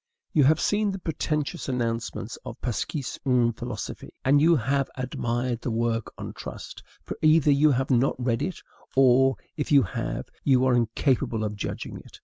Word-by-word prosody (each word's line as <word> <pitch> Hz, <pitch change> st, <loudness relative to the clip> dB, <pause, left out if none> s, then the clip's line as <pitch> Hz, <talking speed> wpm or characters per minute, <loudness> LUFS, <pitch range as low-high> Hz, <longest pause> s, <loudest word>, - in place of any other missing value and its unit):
You 145 Hz, -4 st, +5 dB
have 155 Hz, +3 st, +4 dB
seen 210 Hz, 0 st, +1 dB
the 195 Hz, -, -3 dB
pretentious 155 Hz, -3 st, -2 dB
announcements 115 Hz, -2 st, -2 dB
of -, -, -8 dB
"L'Esquisse 130 Hz, +3 st, -3 dB
d'une 125 Hz, -3 st, +3 dB
Philosophie," 115 Hz, -2 st, -7 dB
and 140 Hz, +2 st, +5 dB
you 165 Hz, +2 st, +5 dB
have 135 Hz, +1 st, 0 dB
admired 120 Hz, -1 st, -2 dB
the -, -, -3 dB
work 115 Hz, 0 st, -1 dB
on -, -, -6 dB
trust; -, -, -8 dB, 0.2 s
for -, -, -6 dB
either 155 Hz, -1 st, +5 dB
you 145 Hz, +2 st, +5 dB
have 135 Hz, +2 st, -1 dB
not 125 Hz, +2 st, +3 dB
read 125 Hz, -1 st, 0 dB
it, 180 Hz, +5 st, -4 dB, 0.3 s
or, 135 Hz, 0 st, +5 dB, 0.2 s
if 150 Hz, -, -3 dB
you 140 Hz, -2 st, +7 dB
have, -, -, -4 dB, 0.2 s
you 130 Hz, -2 st, +4 dB
are 130 Hz, -, +3 dB
incapable 115 Hz, -1 st, +1 dB
of 105 Hz, -1 st, -3 dB
judging 100 Hz, -, -5 dB
it. -, -, -15 dB
130 Hz, 170 wpm, -26 LUFS, 120-145 Hz, 0.3 s, you